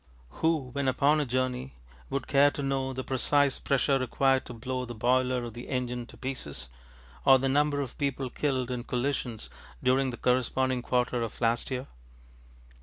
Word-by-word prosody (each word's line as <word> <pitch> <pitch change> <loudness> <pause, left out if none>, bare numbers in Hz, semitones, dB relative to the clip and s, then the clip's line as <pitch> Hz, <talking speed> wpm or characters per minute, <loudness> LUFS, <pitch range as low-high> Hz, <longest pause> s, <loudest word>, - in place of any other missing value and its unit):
Who, 160 -6 +1
when 140 +1 -1
upon 140 +4 +3
a 145 - -1
journey, 125 - -2 0.3
would 140 -2 -2
care 140 +1 +5
to 145 - -5
know 135 -1 -1
the 130 0 -4
precise 140 +2 +2
pressure 135 0 +2
required 130 +1 +1
to - - -7
blow 130 +2 -3
the 120 -1 -7
boiler 125 +2 +2
of 120 -2 -6
the 120 +1 -9
engine 125 -2 -2
to - - -14
pieces, 75 - -4 0.5
or 135 -1 +7
the 135 +1 0
number 145 +1 +2
of 130 -3 -6
people 135 -3 -1
killed 130 -4 -1
in 125 -1 -3
collisions 125 -3 -2 0.4
during 130 +1 +3
the 120 - -6
corresponding 130 0 +1
quarter 125 0 0
of 115 - -4
last 115 0 +1
year? 130 0 -3
130 Hz, 175 wpm, -29 LUFS, 125-135 Hz, 0.5 s, or